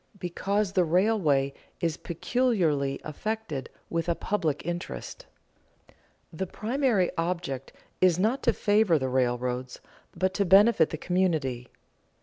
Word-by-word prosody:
Because 195 +3 -1
the 185 - +4
railway 165 -6 +2 0.3
is 165 -2 0
peculiarly 170 - 0
"affected 160 - -4 0.2
with 165 +1 -2
a 170 - +2
public 160 -9 -2
interest." 175 0 -6 1.1
The 190 +4 -3
primary 230 -3 0
object 165 -6 -3 0.3
is 180 -2 +5
not 220 +8 +1
to 235 - +3
favor 205 -5 +3
the 130 -2 -2
railroads, 125 0 -1 0.4
but 185 0 +1
to 200 - +1
benefit 195 -2 +5
the 155 - -4
community. 155 -9 0
175 Hz, 120 wpm, -27 LUFS, 145-205 Hz, 1.1 s, is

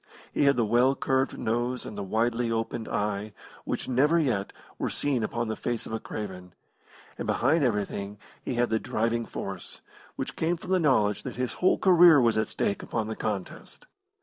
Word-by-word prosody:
He - - +2
had 140 0 +5
the 120 - +2
well 120 +5 +3
curved 135 0 0
nose 120 +3 -1
and - - -7
the 100 - -4
widely 115 +4 0
opened 115 0 -2
eye 105 -1 -2 0.3
which - - -3
never 145 +6 +3
yet 120 -11 0 0.3
were - - -1
seen 140 -4 -1
upon 120 +2 -2
the 110 - -2
face 120 -2 -3
of - - -7
a 110 - -1
craven, 90 -5 -7 0.6
and - - -3
behind 145 +6 +2
everything 105 -3 -1 0.3
he 125 - -3
had 120 -1 +1
the 110 - +2
driving 115 +2 -1
force, 95 -1 -7 0.4
which - - -4
came 170 +2 0
from 180 +3 -8
the 185 - +4
knowledge 110 - +2
that - - -6
his 125 0 -2
whole 180 - +2
career 175 -5 +7
was 115 -3 +3
at 110 - 0
stake 100 - -1
upon 110 -2 -3
the 110 - -3
contest. 105 -4 -5
115 Hz, 190 wpm, -27 LUFS, 105-130 Hz, 0.6 s, career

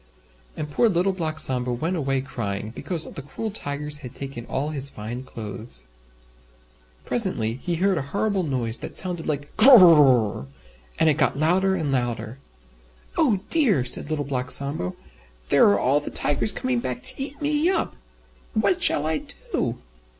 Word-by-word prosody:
And 150 -1 -5
poor 230 +10 +2
Little 185 +1 +1
Black 160 -4 -3
Sambo 125 -4 0
went 160 +9 -2
away 135 -4 -1
crying, 110 -5 -5
because 165 +6 -2
the - - -7
cruel 215 +10 -6
Tigers 150 -5 -1
had 125 -3 -10
taken 135 -4 -7
all 145 +3 -2
his 140 -2 -4
fine 115 +1 -7
clothes. 110 - -7 1.2
Presently 125 - 0
he 175 - -2
heard 185 0 +1
a - - -2
horrible 200 +7 -1
noise 125 -8 -1
that - - -8
sounded 180 -3 -3
like 145 -1 -4
"Gr 235 +5 +10
r 260 - +10
r 190 - +8
r 170 -2 +8
rrrrrrr," 125 - +3 0.5
and 160 - +2
it 155 0 +2
got - - +2
louder 185 +5 +2
and 155 -6 -2
louder. 120 -1 -3 0.8
"Oh 235 - +2
dear!" 230 - +3
said 125 +4 +3
Little 150 -2 -2
Black 130 -2 -3
Sambo, 140 - 0 0.5
"There - - +5
are 100 - +3
all 135 +6 +2
the 145 - -6
Tigers 145 +9 +1
coming 255 -1 -2
back 250 +1 -4
to 260 +1 +4
eat 280 +1 -6
me 295 +3 +1
up! 380 - -1 0.6
What 200 -4 +1
shall 145 - +4
I 155 -1 0 0.3
do?" - - -1
150 Hz, 175 wpm, -23 LUFS, 125-190 Hz, 1.2 s, Gr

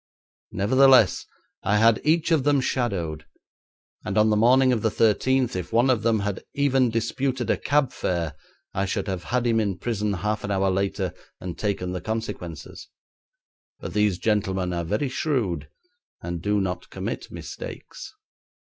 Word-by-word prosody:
Nevertheless, 130 +2 +4 0.3
I 105 - +2
had 115 0 +4
each 160 +2 +2
of 155 -5 +3
them 145 0 +3
shadowed, 90 - -2 0.8
and - - -3
on 110 0 +4
the - - +3
morning 125 +4 +5
of 115 - -1
the 110 - +2
thirteenth 125 +4 +2
if 90 -1 -4
one 120 +3 +4
of 120 -4 +1
them 110 -1 +2
had 100 -2 -3
even 135 -3 +3
disputed 125 +3 -1
a - - +3
cab 140 -2 +1
fare 85 -4 -2 0.4
I 95 - 0
should 95 - -2
have 95 -2 -4
had 125 0 0
him 115 -1 +2
in 100 -4 -1
prison 105 -1 -1
half 105 +3 -2
an 100 - -4
hour 95 -1 +1
later, 95 +1 -1 0.3
and 90 -2 -6
taken 95 -4 -2
the 90 - -4
consequences, 105 -7 -5 0.9
but - - -7
these 105 -3 +2
gentlemen 95 -2 0
are 85 -1 -2
very 105 - -1
shrewd 110 - -1 0.5
and 85 -1 -5
do 105 +3 +1
not 95 -2 -3
commit - - -5
mistakes. - - -8
105 Hz, 160 wpm, -24 LUFS, 95-125 Hz, 0.9 s, morning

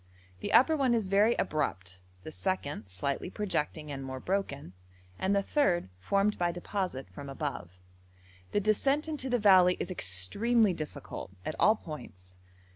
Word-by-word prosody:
The - - -4
upper 265 +8 +6
one 265 -5 +2
is 225 -3 0
very 210 +4 +4
abrupt, 95 - -2 0.2
the - - -7
second 145 - -3
slightly 135 - -2
projecting 155 -6 -2
and 135 -1 -5
more 130 0 -5
broken, 140 - -3 0.5
and 195 +2 +1
the 200 - +2
third 185 - +1
formed 200 - +1
by 175 -1 +2
deposit 175 - -3
from 140 +9 -8
above. 135 - -5 0.7
The 205 - +1
descent 270 +9 +2
into 290 -4 -3
the 245 - +2
valley 185 -4 +6
is - - -3
extremely 190 - +1
difficult 155 - -7
at - - -2
all 215 - +6
points. 95 - -10
180 Hz, 150 wpm, -30 LUFS, 135-210 Hz, 0.7 s, upper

